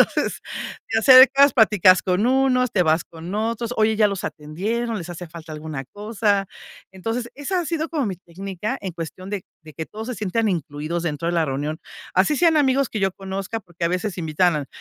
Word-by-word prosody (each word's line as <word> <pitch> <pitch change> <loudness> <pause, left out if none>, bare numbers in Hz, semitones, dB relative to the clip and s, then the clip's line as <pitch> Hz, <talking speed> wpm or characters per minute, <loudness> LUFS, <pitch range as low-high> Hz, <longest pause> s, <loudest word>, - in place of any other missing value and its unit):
Entonces - - -2 0.5
te - - +2
acercas 265 +3 +8
platicas 205 -6 +5
con 185 +4 +1
unos, 255 -1 +3
te 185 -4 +2
vas 160 0 +2
con 170 +3 -8
otros: 230 +2 -2
"Oye, 220 0 +3
¿ya 215 -1 +5
los 200 -2 -3
atendieron? 210 +10 -3
¿Les 175 -2 -7
hace 175 0 -7
falta 165 -1 -10
alguna 150 -3 -6
cosa?". 205 -1 0 0.5
Entonces 225 +5 -4
esa 355 +6 -2
ha - - -3
sido 320 0 -2
como 310 -5 -1
mi 195 -5 -3
técnica 195 +6 -5
en 190 -2 -4
cuestión 175 +3 -7
de 205 -3 -3 0.2
de 155 0 -13
que 160 +1 -6
todos 220 +3 -8
se 250 - -3
sientan 215 +2 0
incluidos 160 0 -3
dentro 165 0 -2
de - - 0
la 165 -2 +1
reunión. 145 +3 -3 0.3
Así 195 +11 +3
sean 325 0 +4
amigos 275 -2 +2
que 215 - -3
yo 195 0 +2
conozca, 195 +3 -5
porque 175 -2 -4
a - - 0
veces 180 +1 -2
invitan, 155 -2 +1
195 Hz, 200 wpm, -22 LUFS, 170-230 Hz, 0.5 s, acercas